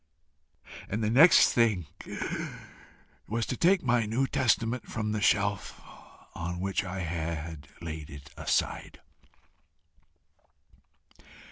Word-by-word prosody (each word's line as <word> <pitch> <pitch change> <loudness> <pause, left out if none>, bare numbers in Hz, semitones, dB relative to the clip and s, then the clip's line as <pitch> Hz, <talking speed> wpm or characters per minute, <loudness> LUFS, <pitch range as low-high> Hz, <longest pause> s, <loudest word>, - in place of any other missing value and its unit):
and 110 +2 -2
the 105 - +1
next 150 +9 +7
thing 110 -8 +2 1.4
was 115 +1 -1
to - - -3
take 180 +6 +3
my 120 -2 +2
New 120 +5 +1
Testament 125 -3 0
from 110 -1 -3
the 105 -1 -2
shelf 100 -2 +1 0.5
on 90 +1 -4
which 95 +1 -1
I 95 0 -5
had 80 -2 -4 0.2
laid 80 -2 -6
it 70 -1 -11
aside. - - -2
105 Hz, 105 wpm, -29 LUFS, 85-115 Hz, 1.4 s, next